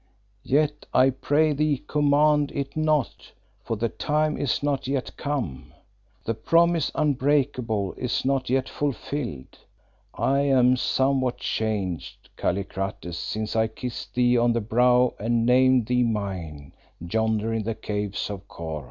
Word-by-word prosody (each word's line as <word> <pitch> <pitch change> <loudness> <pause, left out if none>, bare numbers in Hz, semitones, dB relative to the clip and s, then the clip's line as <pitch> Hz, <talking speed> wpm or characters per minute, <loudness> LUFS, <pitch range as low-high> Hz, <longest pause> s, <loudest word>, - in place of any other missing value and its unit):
Yet 150 +2 0
I 130 +1 +5
pray 150 +4 +1
thee 145 -1 0
command 150 0 +3
it 140 -1 -3
not, 155 -4 -1 0.3
for 115 - -2
the 115 +3 0
time 150 +4 0
is 140 0 -1
not 140 -3 -1
yet 135 -1 -2
come; 125 - -4 0.5
the 115 - 0
promise 165 +7 +2
unbreakable 130 -8 0
is 125 0 -1
not 135 -2 0
yet 130 +1 +1
fulfilled. 130 - -4 0.6
I 140 +1 +1
am 130 -3 +4
somewhat 130 -1 +1
changed, 100 - -3
Kallikrates, 95 -1 -3
since 105 +5 -4
I 110 0 +3
kissed 115 +2 -7
thee 125 -1 +3
on 120 0 +3
the 115 - +1
brow 125 +3 +3
and 115 +2 +1
named 130 0 +4
thee 125 +2 +1
mine, 95 - -3 0.3
yonder 110 +5 -1
in 115 - 0
the 110 +1 -3
Caves 105 -2 -3
of 100 -1 -8
Kôr." 80 -2 -6
125 Hz, 135 wpm, -25 LUFS, 110-140 Hz, 0.6 s, I